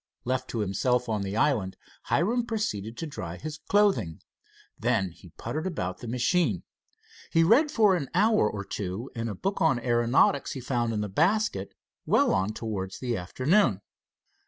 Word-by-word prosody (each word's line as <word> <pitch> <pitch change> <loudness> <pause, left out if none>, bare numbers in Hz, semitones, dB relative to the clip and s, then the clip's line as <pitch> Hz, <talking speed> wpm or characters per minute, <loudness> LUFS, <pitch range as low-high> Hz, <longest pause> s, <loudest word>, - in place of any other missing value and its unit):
Left 130 +1 -1
to 115 - -2
himself 125 +5 0
on 110 -3 -1
the 100 +2 -3
island, 115 -8 +1 0.3
Hiram 235 +8 +1
proceeded 115 - -3
to 165 - -4
dry 90 - -6
his 150 +4 -7
clothing. 195 - +2 0.6
Then 110 -6 +1
he - - -16
puttered 155 +4 -3
about 95 - -3
the 120 - -8
machine. 125 +9 +1 0.7
He 165 -1 +4
read 245 - +5
for 215 -9 +4
an 145 -7 -3
hour 210 - +4
or 100 -1 -5
two 100 +7 -5
in 115 -1 -3
a 105 - -4
book 195 - -2
on 130 -2 +3
aeronautics 120 +3 +2
he 135 - -5
found 120 -2 -1
in 105 -2 -1
the 105 - -2
basket, 160 - 0 0.3
well - - +4
on 95 +2 +1
towards 100 -4 -4
the 120 -2 -2
afternoon. 125 - +1
120 Hz, 165 wpm, -27 LUFS, 105-165 Hz, 0.7 s, read